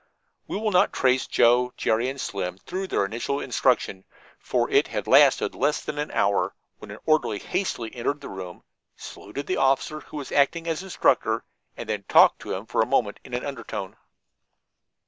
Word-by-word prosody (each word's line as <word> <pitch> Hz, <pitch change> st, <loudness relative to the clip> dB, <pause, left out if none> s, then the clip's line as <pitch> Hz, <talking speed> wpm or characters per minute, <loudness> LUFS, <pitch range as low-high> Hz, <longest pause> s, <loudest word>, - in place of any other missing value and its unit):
We -, -, -3 dB
will 215 Hz, 0 st, -1 dB
not 180 Hz, -, +4 dB
trace 130 Hz, 0 st, +1 dB
Joe, 125 Hz, +1 st, +3 dB
Jerry 115 Hz, +3 st, +1 dB
and 135 Hz, +1 st, -6 dB
Slim 90 Hz, -6 st, -4 dB
through 185 Hz, -, -5 dB
their 100 Hz, -, +1 dB
initial 120 Hz, +7 st, -3 dB
instruction, 125 Hz, -7 st, 0 dB, 0.4 s
for -, -, 0 dB
it -, -, +4 dB
had -, -, -4 dB
lasted -, -, +5 dB
less 150 Hz, +1 st, +1 dB
than 145 Hz, -, -5 dB
an 150 Hz, -, -2 dB
hour, 100 Hz, 0 st, +1 dB, 0.2 s
when -, -, -11 dB
an -, -, -8 dB
orderly 155 Hz, -9 st, +2 dB
hastily 120 Hz, -, -3 dB
entered 135 Hz, +5 st, -2 dB
the -, -, -8 dB
room, 95 Hz, -2 st, -8 dB, 0.3 s
saluted 120 Hz, +8 st, -8 dB
the 185 Hz, -, -1 dB
officer 135 Hz, +3 st, +1 dB
who 155 Hz, -, -10 dB
was 145 Hz, -, -6 dB
acting 145 Hz, +4 st, +2 dB
as 165 Hz, 0 st, -2 dB
instructor, 190 Hz, -1 st, +1 dB, 0.3 s
and 115 Hz, -, -7 dB
then 105 Hz, -3 st, -3 dB
talked -, -, +6 dB
to -, -, -5 dB
him 95 Hz, +4 st, -6 dB
for -, -, 0 dB
a 110 Hz, -, +1 dB
moment 120 Hz, -5 st, 0 dB
in 125 Hz, -, -6 dB
an 125 Hz, -, -3 dB
undertone. 115 Hz, -8 st, -6 dB
125 Hz, 185 wpm, -25 LUFS, 110-150 Hz, 0.4 s, talked